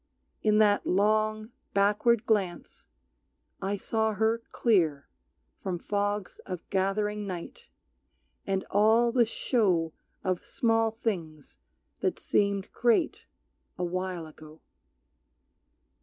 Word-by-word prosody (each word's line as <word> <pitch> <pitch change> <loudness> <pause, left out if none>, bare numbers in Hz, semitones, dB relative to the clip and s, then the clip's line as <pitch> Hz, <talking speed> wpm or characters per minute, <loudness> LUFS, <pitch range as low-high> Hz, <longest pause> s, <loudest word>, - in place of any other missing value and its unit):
In 215 -1 +3
that 210 -1 +4
long, 215 +3 +1 0.2
backward 210 +3 +3
glance 195 -6 -1 0.7
I 200 +2 -1
saw 220 +2 0
her 220 +2 +1
clear 165 - +2 0.5
From 185 -2 -2
fogs 205 +2 -2
of 180 -3 -6
gathering 205 +2 0
night, 180 -3 -7 0.8
and 195 -1 0
all 220 +3 +4
the 240 -2 +3
show 185 - +1 0.3
Of 185 -2 -1
small 225 -1 +1
things 165 - -5 0.4
that - - 0
seemed 200 -1 0
great 235 -2 +1 0.5
a 180 - -2
while 180 -1 -3
ago. 155 0 -14
205 Hz, 100 wpm, -28 LUFS, 180-220 Hz, 0.8 s, that